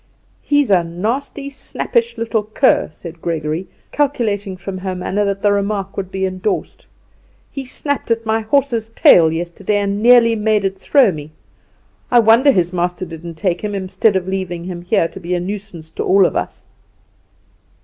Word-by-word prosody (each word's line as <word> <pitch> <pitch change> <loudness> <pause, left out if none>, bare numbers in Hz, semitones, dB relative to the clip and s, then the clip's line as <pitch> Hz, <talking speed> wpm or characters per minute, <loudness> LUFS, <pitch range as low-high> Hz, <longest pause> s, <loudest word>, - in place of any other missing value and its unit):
"He's 290 -6 +1
a 180 -3 +4
nasty, 230 - -3
snappish 465 - -2
little 230 -1 0
cur!" 215 +6 +2
said 165 +1 -11
Gregory, 160 +1 -3 0.2
calculating 215 -9 -1
from 185 0 -6
her 185 0 -4
manner 190 +3 -1
that 200 0 -2
the 205 - +4
remark 200 -1 -1
would 190 -2 -4
be 190 0 -2
endorsed. 185 +2 -3 0.6
"He 275 -1 -6
snapped 285 +1 -2
at 230 0 0
my 220 0 +1
horse's 230 -1 0
tail 165 -7 +5
yesterday, 175 +5 -2
and 200 0 -1
nearly 235 -1 +6
made 215 -2 +1
it 190 0 -2
throw 265 -1 +4
me. 155 -1 -9 0.8
I 245 - +4
wonder 235 +5 +6
his 180 -5 0
master 180 +1 -2
didn't 165 0 -9
take 175 +2 -1
him, 210 -1 -3
instead 195 +2 +1
of 185 -1 -1
leaving 185 -3 -3
him 175 -1 -6
here 175 -1 +1
to 190 - -11
be 180 0 -2
a - - 0
nuisance 185 -4 -7
to - - -4
all 195 0 +4
of - - -1
us!" - - -4
195 Hz, 170 wpm, -18 LUFS, 180-225 Hz, 0.8 s, nearly